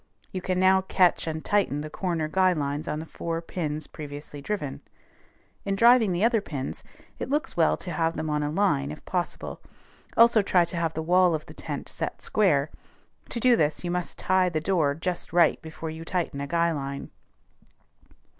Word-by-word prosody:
You 185 Hz, -, -4 dB
can 185 Hz, 0 st, -1 dB
now 190 Hz, 0 st, +5 dB
catch 185 Hz, -3 st, +2 dB
and 160 Hz, 0 st, -4 dB
tighten 195 Hz, -8 st, +1 dB
the 155 Hz, -, -6 dB
corner 170 Hz, -4 st, -1 dB
guy 185 Hz, +3 st, +3 dB
lines 145 Hz, 0 st, -3 dB
on 150 Hz, -, -2 dB
the 160 Hz, -, -6 dB
four 165 Hz, 0 st, -4 dB
pins 155 Hz, -3 st, -4 dB
previously 145 Hz, -1 st, -8 dB
driven. 150 Hz, -5 st, -4 dB, 0.8 s
In 195 Hz, 0 st, -1 dB
driving 235 Hz, -1 st, +6 dB
the 175 Hz, +3 st, 0 dB
other 230 Hz, -2 st, +3 dB
pins, 140 Hz, -8 st, -5 dB, 0.4 s
it -, -, -4 dB
looks 295 Hz, +2 st, -1 dB
well 165 Hz, -2 st, +3 dB
to 180 Hz, -, -7 dB
have 165 Hz, 0 st, 0 dB
them 155 Hz, -, -2 dB
on 150 Hz, -1 st, 0 dB
a 145 Hz, -, -1 dB
line, 150 Hz, -5 st, +1 dB
if 150 Hz, -, -9 dB
possible; 180 Hz, -2 st, -3 dB, 0.6 s
also 230 Hz, -1 st, +7 dB
try 180 Hz, -3 st, +3 dB
to 170 Hz, -, -7 dB
have 165 Hz, -1 st, -1 dB
the 160 Hz, -, -2 dB
wall 180 Hz, 0 st, +4 dB
of 155 Hz, -, -5 dB
the -, -, -12 dB
tent -, -, -5 dB
set -, -, -5 dB
square: 155 Hz, -9 st, +2 dB, 0.6 s
to 235 Hz, -, -3 dB
do 245 Hz, +1 st, +5 dB
this 150 Hz, -6 st, 0 dB
you 175 Hz, -, -2 dB
must 180 Hz, -1 st, -3 dB
tie 185 Hz, -1 st, +2 dB
the 160 Hz, -3 st, -1 dB
door 160 Hz, -4 st, +1 dB
just 175 Hz, +3 st, -3 dB
right 170 Hz, -2 st, +4 dB
before 160 Hz, 0 st, -6 dB
you 160 Hz, +1 st, -7 dB
tighten 165 Hz, -5 st, -2 dB
a 140 Hz, -, -3 dB
guy 170 Hz, +2 st, +2 dB
line. 140 Hz, -2 st, -5 dB
170 Hz, 190 wpm, -26 LUFS, 155-185 Hz, 0.8 s, also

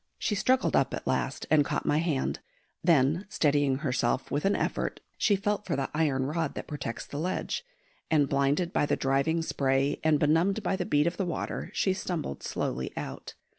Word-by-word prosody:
She -, -, -1 dB
struggled 255 Hz, +6 st, +2 dB
up -, -, +2 dB
at -, -, -7 dB
last -, -, -1 dB
and 155 Hz, -2 st, +6 dB
caught -, -, -2 dB
my 150 Hz, -, +2 dB
hand; 160 Hz, -5 st, -1 dB, 0.4 s
then, 160 Hz, +3 st, +3 dB
steadying 145 Hz, -5 st, +2 dB
herself 125 Hz, 0 st, 0 dB
with 145 Hz, +4 st, -1 dB
an 200 Hz, -, +3 dB
effort, -, -, -1 dB, 0.2 s
she 205 Hz, -, +3 dB
felt 205 Hz, +1 st, -1 dB
for 165 Hz, -, 0 dB
the 135 Hz, -1 st, -2 dB
iron 145 Hz, -4 st, +1 dB
rod 160 Hz, +1 st, -2 dB
that -, -, -5 dB
protects 145 Hz, -6 st, -5 dB
the 145 Hz, -, -6 dB
ledge, 180 Hz, -, -2 dB, 0.5 s
and 150 Hz, -3 st, +3 dB
blinded 140 Hz, +6 st, +1 dB
by 145 Hz, -, +2 dB
the -, -, +2 dB
driving 140 Hz, +5 st, +1 dB
spray 135 Hz, -1 st, +1 dB
and 160 Hz, -1 st, +4 dB
benumbed 170 Hz, +8 st, +2 dB
by 190 Hz, -, +1 dB
the 180 Hz, -2 st, -3 dB
beat 145 Hz, 0 st, +3 dB
of 170 Hz, +1 st, -1 dB
the 195 Hz, -, 0 dB
water, 170 Hz, -, -3 dB
she 190 Hz, -, +2 dB
stumbled 170 Hz, -, -4 dB
slowly 65 Hz, -, -3 dB
out. -, -, -6 dB
155 Hz, 190 wpm, -29 LUFS, 140-175 Hz, 0.5 s, and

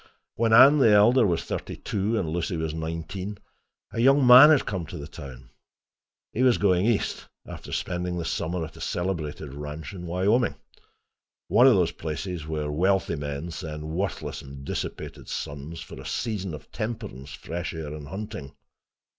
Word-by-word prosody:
When 115 Hz, 0 st, +1 dB
Anne, 135 Hz, +6 st, +8 dB
the 125 Hz, -, +6 dB
elder, 110 Hz, +3 st, +6 dB
was 85 Hz, -3 st, 0 dB
thirty -, -, -5 dB
two 105 Hz, +3 st, -1 dB
and 95 Hz, -, -1 dB
Lucy 85 Hz, +2 st, -2 dB
was 80 Hz, -1 st, -2 dB
nineteen, 85 Hz, +5 st, -5 dB, 0.5 s
a -, -, -4 dB
young 135 Hz, +3 st, +5 dB
man 125 Hz, +4 st, +10 dB
had 150 Hz, -4 st, +4 dB
come 95 Hz, -6 st, -3 dB
to 85 Hz, -, -7 dB
the 70 Hz, -, -7 dB
town. 65 Hz, -5 st, -11 dB, 0.8 s
He 125 Hz, -, -1 dB
was 130 Hz, -2 st, +5 dB
going 95 Hz, 0 st, +3 dB
east, 115 Hz, -4 st, -1 dB, 0.2 s
after -, -, -9 dB
spending 90 Hz, 0 st, -2 dB
the 85 Hz, -, -3 dB
summer 85 Hz, 0 st, -2 dB
at 80 Hz, -, -12 dB
a 80 Hz, -, -12 dB
celebrated 80 Hz, -6 st, -3 dB
ranch 75 Hz, +4 st, -7 dB
in 90 Hz, -2 st, -7 dB
Wyoming—one 100 Hz, +8 st, 0 dB
of -, -, +7 dB
those -, -, +2 dB
places 80 Hz, +1 st, -5 dB
where 75 Hz, -2 st, -2 dB
wealthy 95 Hz, +2 st, +1 dB
men 75 Hz, +3 st, -5 dB
send 75 Hz, -1 st, -6 dB
worthless 95 Hz, +4 st, -3 dB
and 70 Hz, 0 st, -10 dB
dissipated -, -, -5 dB
sons, 75 Hz, +4 st, -5 dB
for -, -, -9 dB
a -, -, -12 dB
season 100 Hz, -8 st, -3 dB
of 75 Hz, -, -13 dB
temperance, 105 Hz, -, -5 dB
fresh 85 Hz, +1 st, -5 dB
air 75 Hz, -2 st, -5 dB
and 75 Hz, -2 st, -8 dB
hunting. 95 Hz, -8 st, -7 dB
85 Hz, 165 wpm, -26 LUFS, 75-105 Hz, 0.8 s, man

